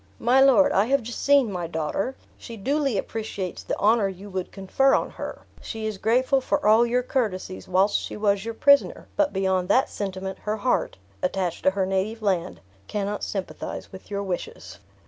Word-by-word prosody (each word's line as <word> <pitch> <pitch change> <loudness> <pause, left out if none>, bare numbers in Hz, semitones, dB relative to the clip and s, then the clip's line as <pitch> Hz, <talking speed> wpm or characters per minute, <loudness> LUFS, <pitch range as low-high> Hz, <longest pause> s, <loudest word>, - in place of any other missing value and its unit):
"My 250 +3 +4
lord, 275 +1 +6
I 195 - +3
have 270 +1 +1
just 235 +2 -6
seen 280 -6 +4
my 175 -3 -3
daughter. 165 - -2 0.2
She 230 -2 -10
duly 275 +2 0
appreciates 200 -4 -4
the - - -3
honor 215 0 +3
you 195 +1 -8
would 185 -1 -4
confer 205 +8 +2
on - - -1
her; - - -7 0.2
she 220 -1 -5
is 215 -3 -4
grateful 255 +5 +2
for 290 +3 -1
all 220 +3 +5
your 250 +1 +1
courtesies 210 -8 -2
whilst 190 +3 +3
she - - -6
was 200 -2 +1
your 230 0 -5
prisoner, 280 +4 +3
but 300 -1 +2
beyond 190 -1 0
that 255 +6 +3
sentiment, 190 -1 -5
her 215 +1 -2
heart, 250 +4 0 0.2
attached 180 -2 -1
to - - +7
her 190 0 -1
native 195 +4 -2
land, 185 -3 -1 0.3
cannot 205 0 -3
sympathize 195 -2 -5
with 190 - -12
your 200 -1 -2
wishes." 185 -3 -6
210 Hz, 185 wpm, -25 LUFS, 190-245 Hz, 0.3 s, to